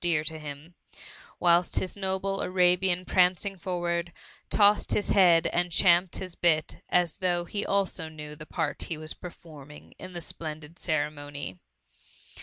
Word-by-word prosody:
dear 165 Hz, -3 st, +1 dB
to 160 Hz, 0 st, -4 dB
him; 150 Hz, +3 st, -9 dB, 0.7 s
whikt 175 Hz, 0 st, +3 dB
his 185 Hz, -, -1 dB
noble 195 Hz, 0 st, -2 dB
Arabian 180 Hz, 0 st, +2 dB
prancing 185 Hz, +2 st, +2 dB
forward, 175 Hz, -1 st, -2 dB, 0.4 s
tossed 205 Hz, 0 st, +4 dB
his 205 Hz, -, +1 dB
bead 175 Hz, -4 st, +5 dB
and 175 Hz, 0 st, 0 dB
champed 175 Hz, 0 st, +4 dB
his 185 Hz, -2 st, -5 dB
bit 160 Hz, -2 st, +1 dB
as 175 Hz, -3 st, +1 dB
though 175 Hz, -2 st, +1 dB
he 205 Hz, +4 st, -3 dB
also 195 Hz, -5 st, -1 dB
knew 150 Hz, -1 st, -9 dB
the 155 Hz, +1 st, -11 dB
part 160 Hz, -4 st, -2 dB
he 165 Hz, -, -3 dB
was 155 Hz, 0 st, -5 dB
per 180 Hz, -, -8 dB
forming 150 Hz, -4 st, -14 dB
in 185 Hz, 0 st, -9 dB
the 175 Hz, -, -5 dB
splendid 155 Hz, 0 st, -6 dB
ceremony. 145 Hz, -, -3 dB
175 Hz, 150 wpm, -28 LUFS, 155-185 Hz, 0.7 s, bead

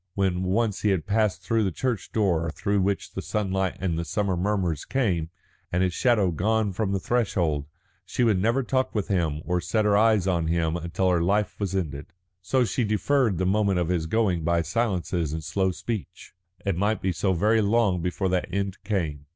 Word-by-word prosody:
When 95 Hz, -2 st, +1 dB
once 100 Hz, +3 st, 0 dB
he 105 Hz, -, +2 dB
had 95 Hz, -5 st, 0 dB
passed 105 Hz, -3 st, 0 dB
through 115 Hz, +3 st, +1 dB
that 95 Hz, -, -2 dB
church 120 Hz, -8 st, -2 dB
door, 85 Hz, -7 st, +1 dB
through 100 Hz, +5 st, 0 dB
which 100 Hz, +1 st, -1 dB
the -, -, -4 dB
sunlight 95 Hz, -3 st, -1 dB
and 85 Hz, -4 st, -1 dB
the -, -, -1 dB
summer 100 Hz, +2 st, -1 dB
murmurs 90 Hz, -4 st, -1 dB
came, 95 Hz, -12 st, 0 dB, 0.4 s
and 90 Hz, +2 st, +1 dB
his 90 Hz, -1 st, 0 dB
shadow 105 Hz, -4 st, +2 dB
gone 105 Hz, +4 st, 0 dB
from 100 Hz, +1 st, -1 dB
the 100 Hz, -, 0 dB
threshold, 85 Hz, -, 0 dB, 0.4 s
she 95 Hz, +7 st, -1 dB
would 105 Hz, -6 st, +3 dB
never 120 Hz, +6 st, +2 dB
talk 130 Hz, 0 st, -1 dB
with 105 Hz, 0 st, -1 dB
him 80 Hz, -6 st, 0 dB
or 90 Hz, +2 st, 0 dB
set 105 Hz, +5 st, 0 dB
her 105 Hz, -1 st, +4 dB
eyes 110 Hz, -3 st, +4 dB
on 85 Hz, -4 st, +1 dB
him 80 Hz, -1 st, 0 dB
until 85 Hz, +2 st, 0 dB
her 85 Hz, -2 st, +2 dB
life 100 Hz, +4 st, 0 dB
was 100 Hz, -2 st, -2 dB
ended. 75 Hz, -6 st, -3 dB, 0.3 s
So 125 Hz, +7 st, +1 dB
she 115 Hz, +4 st, -1 dB
deferred 110 Hz, 0 st, +1 dB
the 95 Hz, -, 0 dB
moment 100 Hz, 0 st, +2 dB
of 90 Hz, -1 st, 0 dB
his 85 Hz, -3 st, 0 dB
going 95 Hz, -4 st, +1 dB
by 85 Hz, +1 st, +1 dB
silences 90 Hz, -7 st, -1 dB
and 80 Hz, 0 st, -4 dB
slow 95 Hz, +5 st, 0 dB
speech. 105 Hz, +3 st, -6 dB, 0.3 s
It 100 Hz, -3 st, +1 dB
might 105 Hz, +4 st, 0 dB
be 95 Hz, -, +1 dB
so 95 Hz, +3 st, 0 dB
very 110 Hz, +6 st, +3 dB
long 100 Hz, -4 st, +2 dB
before 90 Hz, +2 st, -1 dB
that 90 Hz, -1 st, -1 dB
end 100 Hz, 0 st, -3 dB
came. 80 Hz, -9 st, -2 dB
95 Hz, 200 wpm, -25 LUFS, 85-105 Hz, 0.4 s, her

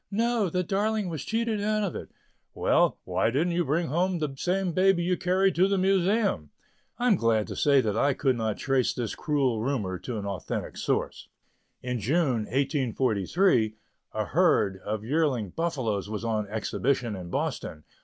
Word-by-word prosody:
"No! 225 Hz, -1 st, +1 dB
the 180 Hz, +2 st, 0 dB
darling 205 Hz, +2 st, 0 dB
was 160 Hz, -4 st, -4 dB
cheated 225 Hz, -2 st, -1 dB
out 215 Hz, +1 st, 0 dB
of 195 Hz, -, -2 dB
it." -, -, -7 dB, 0.5 s
"Well, -, -, +2 dB
why 95 Hz, +4 st, 0 dB
didn't 160 Hz, +8 st, 0 dB
you 175 Hz, +1 st, +1 dB
bring 165 Hz, +3 st, 0 dB
home 180 Hz, +5 st, +1 dB
the 150 Hz, -4 st, -2 dB
same 185 Hz, +5 st, 0 dB
baby 185 Hz, 0 st, +3 dB
you 180 Hz, +1 st, +1 dB
carried 185 Hz, +1 st, +2 dB
to 180 Hz, +4 st, +3 dB
the 195 Hz, 0 st, +1 dB
Museum?" 190 Hz, -, +1 dB, 0.5 s
I 245 Hz, -, -2 dB
am 230 Hz, -5 st, +5 dB
glad 115 Hz, -, +1 dB
to -, -, -5 dB
say 140 Hz, -2 st, +4 dB
that 105 Hz, -4 st, -1 dB
I 140 Hz, +4 st, +2 dB
could 130 Hz, -3 st, +1 dB
not 110 Hz, -2 st, -2 dB
trace 135 Hz, -2 st, +1 dB
this 120 Hz, -4 st, -3 dB
cruel 135 Hz, -7 st, 0 dB
rumor 110 Hz, -8 st, -2 dB
to 120 Hz, -3 st, -5 dB
an 100 Hz, -, -4 dB
authentic 100 Hz, -4 st, -4 dB
source. -, -, -2 dB, 0.6 s
In 125 Hz, -1 st, -2 dB
June 130 Hz, -, +1 dB
1843, 130 Hz, -, +1 dB, 0.4 s
a -, -, -1 dB
herd 95 Hz, -1 st, +2 dB
of 105 Hz, 0 st, -4 dB
yearling 130 Hz, -, 0 dB
buffaloes 125 Hz, -, -2 dB
was 110 Hz, +1 st, -4 dB
on 110 Hz, -2 st, -1 dB
exhibition 115 Hz, +2 st, -1 dB
in 90 Hz, -2 st, -7 dB
Boston. 75 Hz, -2 st, -3 dB
140 Hz, 175 wpm, -27 LUFS, 110-185 Hz, 0.6 s, am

